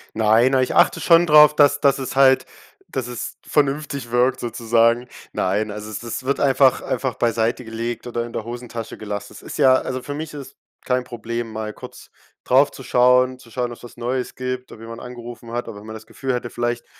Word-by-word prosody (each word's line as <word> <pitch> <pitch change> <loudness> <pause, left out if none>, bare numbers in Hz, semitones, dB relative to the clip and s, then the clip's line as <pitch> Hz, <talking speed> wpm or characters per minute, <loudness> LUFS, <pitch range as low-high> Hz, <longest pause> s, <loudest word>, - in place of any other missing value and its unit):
Nein, 110 +4 +4
a 130 - +4
ich 130 - -1
achte - - +4
schon 170 0 +5
drauf, 150 -1 +7
dass 145 -1 +4
dass 140 -1 +3
es 135 0 -5
halt 135 -1 +5 0.4
dass 130 -3 -3
es 125 -1 -6
vernünftig 140 -3 -1
wirkt 125 +2 +2
sozusagen. 115 +1 +1 0.2
Nein, 105 +3 0
also 105 +1 -7
es 105 - -6
es 120 +2 -5
wird 140 +2 0
einfach 135 -2 +4
einfach 130 -1 -2
beiseite 115 +1 0
gelegt 115 +1 -5
oder 120 -1 -3
in 120 - -9
der 110 - -4
Hosentasche 120 -1 -7
gelassen. 105 -1 -6
Es - - -12
ist - - -8
ja 130 -1 +6
also 130 0 -2
für 145 - -6
mich 155 +1 -6
ist 145 -3 -8
es - - -21 0.3
kein 125 0 0
Problem 115 -1 -5
mal 110 0 -4
kurz - - -12 0.3
drauf - - +4
zu - - -11
schauen, 125 +1 +3
zu 120 - -17
schauen 120 +1 -3
ob's 120 - -12
was 120 - -13
Neues 125 +1 -3
gibt, 130 0 -5
ob 110 - -12
jemand 115 +1 -9
angerufen 120 -1 -9
hat, 120 0 -3
aber 105 -3 -8
wenn 105 - -13
man 110 - -7
das 110 0 -10
Gefühl 135 +2 -4
hätte 125 -1 -3
vielleicht 120 0 -2
120 Hz, 215 wpm, -21 LUFS, 115-130 Hz, 0.4 s, drauf